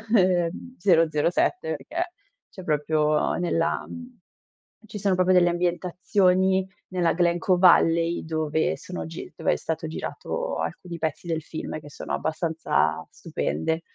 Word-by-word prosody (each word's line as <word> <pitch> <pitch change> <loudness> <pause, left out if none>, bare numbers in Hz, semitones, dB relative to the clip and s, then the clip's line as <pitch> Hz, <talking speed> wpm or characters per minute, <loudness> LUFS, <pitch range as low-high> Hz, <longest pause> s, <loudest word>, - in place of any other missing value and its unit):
ehm, 180 +5 +1
007, 165 +1 +2
perché 340 - -4 0.4
c'è 185 - -10
proprio 150 0 +1
nella 165 -1 0
mhmm, 250 -1 -10 0.7
ci 210 - -7
sono 190 -1 +2
proprio 185 0 +3
delle 175 -1 +5
ambientazioni 185 +2 +1 0.2
nella 180 -2 +1
Glen 175 0 +2
Coe 180 +1 +2
Valley, 170 -2 +4
dove 160 -1 0
sono 180 - -6
gi 165 +1 -8
dove - - +1
è - - 0
stato 160 0 -3
girato - - -4
alcuni 175 -2 -5
pezzi 155 +1 -3
del 160 -1 -1
film 155 0 -6
che 145 - -12
sono - - -6
abbastanza 160 0 0
stupende. 160 - -2
170 Hz, 135 wpm, -25 LUFS, 160-185 Hz, 0.7 s, delle